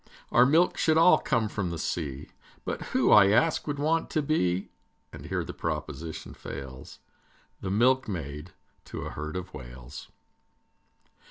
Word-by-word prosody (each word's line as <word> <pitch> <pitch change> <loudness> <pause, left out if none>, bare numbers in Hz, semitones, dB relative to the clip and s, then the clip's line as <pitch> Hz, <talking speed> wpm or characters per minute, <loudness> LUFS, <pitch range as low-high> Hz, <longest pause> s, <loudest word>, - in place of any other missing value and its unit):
Our 125 +1 +6
milk 165 +5 +3
should 160 -1 +3
all 165 +2 +7
come 115 -2 0
from 100 -4 -3
the 85 - -4
sea, 75 -4 -4 0.4
But - - -3
who, - - +2
I 100 - +8
ask, 155 +12 +2
would 145 -1 -2
want 160 +3 +1
to 155 - 0
be, 95 - 0 0.4
And - - -9
here - - -1
the - - -7
proposition 80 -1 -5
fails, 65 -2 -9 0.6
The 95 - -4
milkmaid 95 - 0 0.3
to - - -7
a - - -5
herd 75 +2 -6
of 90 0 -5
Whales? 60 +3 -10
95 Hz, 150 wpm, -28 LUFS, -, 0.6 s, I